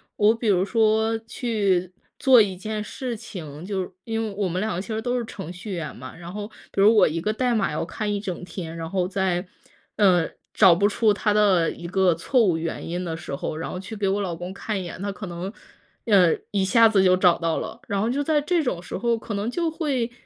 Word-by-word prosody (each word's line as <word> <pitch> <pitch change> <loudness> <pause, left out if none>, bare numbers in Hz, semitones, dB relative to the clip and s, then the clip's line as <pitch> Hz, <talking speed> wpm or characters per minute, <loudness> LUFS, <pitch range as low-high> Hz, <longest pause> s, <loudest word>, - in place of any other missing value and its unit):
我 210 +1 +4
比 230 0 -4
如 185 -3 +4
说 220 +1 +2
去 205 -6 -1 0.3
做 255 -4 +7
一 195 -3 0
件 215 +3 -4
事 240 +1 -5
情， 160 -5 -8
就 195 -2 -2
是 180 - -6
因 225 -1 -2
为 215 - -4
我 200 - 0
们 180 +1 -2
两 215 0 -1
个 180 - -2
其 - - -10
实 220 -1 -2
都 245 +1 -1
是 235 - -4
程 190 -6 -7
序 185 +3 -7
员 160 -4 -4
嘛， 130 +1 -10
然 175 +1 -9
后 205 0 -5 0.2
比 - - -4
如 215 +3 +6
我 - - +7
一 165 - -2
个 210 +6 -1
代 245 +2 +1
码 200 -8 0
要 155 - -1
看 205 +4 -3
一 200 - -2
整 180 -3 -5
天， 165 -3 -7
然 165 0 -5
后 185 -1 0
在， 190 -1 -1 0.5
呃， 180 -5 +4 0.2
找 190 -5 +7
不 200 +4 +3
出 215 +1 +2
它 210 +1 0
的 195 -6 +4
一 170 - -10
个 185 -1 +3
错 240 +10 +1
误 170 -4 +2
原 165 0 -4
因 175 +2 -3
的 165 -2 -4
时 165 -5 -5
候， 155 +2 -4
然 165 - -4
后 - - -5
去 205 +4 -7
给 200 -1 0
我 200 +1 +1
老 185 -3 -2
公 175 +3 -6
看 200 0 -3
一 - - -4
眼， 175 - -8
他 200 - -2
可 200 - -7
能， 175 +2 -5 0.5
呃， 190 -7 +5 0.2
一 200 -2 +1
下 225 +4 +6
子 200 -3 +3
就 185 -1 +5
找 180 -2 +4
到 165 -1 0
了。 - - -5
然 200 -1 0
后 220 - +1
就 285 +3 0
在 305 0 +2
这 325 +2 +1
种 180 -9 -2
时 - - -7
候， 235 +2 +1
可 220 0 -6
能 205 +3 -2
就 335 +3 -1
会 275 -8 -1
200 Hz, 270 characters per minute, -24 LUFS, 180-220 Hz, 0.5 s, 做